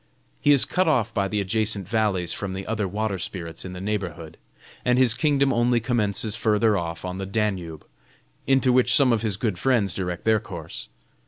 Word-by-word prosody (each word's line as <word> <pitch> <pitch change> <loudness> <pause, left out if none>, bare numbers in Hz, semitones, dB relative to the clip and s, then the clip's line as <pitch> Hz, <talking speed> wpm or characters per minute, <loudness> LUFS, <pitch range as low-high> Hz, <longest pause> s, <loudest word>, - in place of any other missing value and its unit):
He 145 - +3
is 140 -3 +6
cut 185 -1 0
off 120 -8 +1
by 100 -2 0
the 105 +1 -2
adjacent 100 -1 -1
valleys 105 -5 0
from 100 -2 -4
the 95 +1 -5
other 105 -2 -2
water 100 0 -2
spirits 85 -2 -5
in 90 - -7
the 90 - -7
neighborhood, 90 -5 -4 0.5
and 125 0 +2
his 125 -3 +5
kingdom 140 +1 +2
only 120 +1 +2
commences 110 -2 0
further 110 -1 +2
off 85 -2 -4
on 90 +1 -5
the 95 - -4
Danube, 95 -7 -2 0.6
into 135 -1 +3
which 125 -2 +4
some 130 -4 +4
of 110 - 0
his 105 -4 -1
good 105 -5 -2
friends 115 -8 +2
direct 90 -1 -4
their 110 -1 +4
course. 85 -6 -8
105 Hz, 190 wpm, -24 LUFS, 95-120 Hz, 0.6 s, is